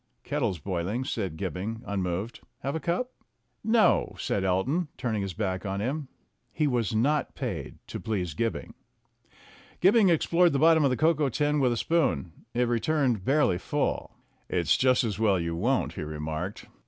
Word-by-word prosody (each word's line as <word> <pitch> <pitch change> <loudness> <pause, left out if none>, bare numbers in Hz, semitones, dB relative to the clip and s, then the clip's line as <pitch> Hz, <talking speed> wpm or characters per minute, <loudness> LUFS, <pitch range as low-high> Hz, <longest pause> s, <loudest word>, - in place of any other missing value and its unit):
"Kettle's 90 - -1
boiling," 95 - -2
said 95 -11 -3
Gibbing, 100 +6 -4
unmoved. 95 +2 -3 0.2
"Have 140 +3 -2
a - - -1
cup?" 175 - -1 0.5
"No," 225 0 +3
said 100 - -1
Elton, 110 - +1
turning 110 -4 -1
his 95 -2 -4
back 95 -4 -2
on 100 0 -2
him. 135 +7 -2 0.4
He 155 - 0
was 120 -6 0
not 145 +6 +1
paid - - -4
to - - -6
please 95 -7 -2
Gibbing. 115 +8 -2 1.1
Gibbing 200 +2 +5
explored 170 +1 +3
the - - +2
bottom 160 +1 +5
of 140 - +4
the 125 - 0
cocoa 155 -2 +3
tin 150 +3 +1
with 130 -3 +3
a 120 - 0
spoon. 140 - +1 0.2
It 125 - +3
returned 120 -2 +1
barely 135 -8 +2
full. - - -2 0.3
"It's 85 -2 +2
just 130 -1 +3
as 110 -3 -2
well 100 -4 +3
you 85 -1 -2
won't," 85 - 0
he - - -6
remarked. 80 +5 -4
115 Hz, 165 wpm, -28 LUFS, 95-150 Hz, 1.1 s, Gibbing